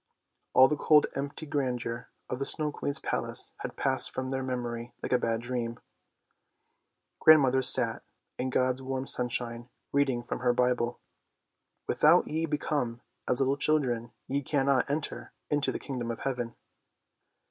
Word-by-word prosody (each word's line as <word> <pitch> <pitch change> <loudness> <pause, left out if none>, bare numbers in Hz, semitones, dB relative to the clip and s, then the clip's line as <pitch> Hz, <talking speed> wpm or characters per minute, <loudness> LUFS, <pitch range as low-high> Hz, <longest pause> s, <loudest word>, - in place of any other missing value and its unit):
All 130 - +8
the 150 - 0
cold 150 0 +5
empty 140 +3 -4
grandeur 125 -5 -3 0.2
of 125 - -4
the 140 - -1
Snow 150 -2 +3
Queen's 145 -1 -1
palace - - -3
had - - -6
passed - - +1
from 130 0 -4
their 135 0 -1
memory 120 -2 -4
like - - -1
a 125 - +4
bad 115 -1 -1
dream. 120 -1 -4 1.4
Grandmother 135 -4 +6
sat 125 -3 +4 0.4
in 130 - -1
God's 130 0 +1
warm 130 0 -3
sunshine 120 -1 0 0.2
reading 135 -4 +1
from - - -4
her 125 -1 +2
Bible. 125 -1 0 0.5
" - - -53
Without - - +4
ye 160 +2 -1
become 145 -6 -2 0.3
as 125 - +1
little 135 +1 +1
children 125 -6 0 0.2
ye 140 +2 -1
cannot 140 -1 +1
enter 150 +2 -4 0.2
into 145 -1 +1
the - - -3
Kingdom 125 -4 -5
of 115 - -5
Heaven." 125 -3 -3
130 Hz, 150 wpm, -29 LUFS, 120-140 Hz, 1.4 s, All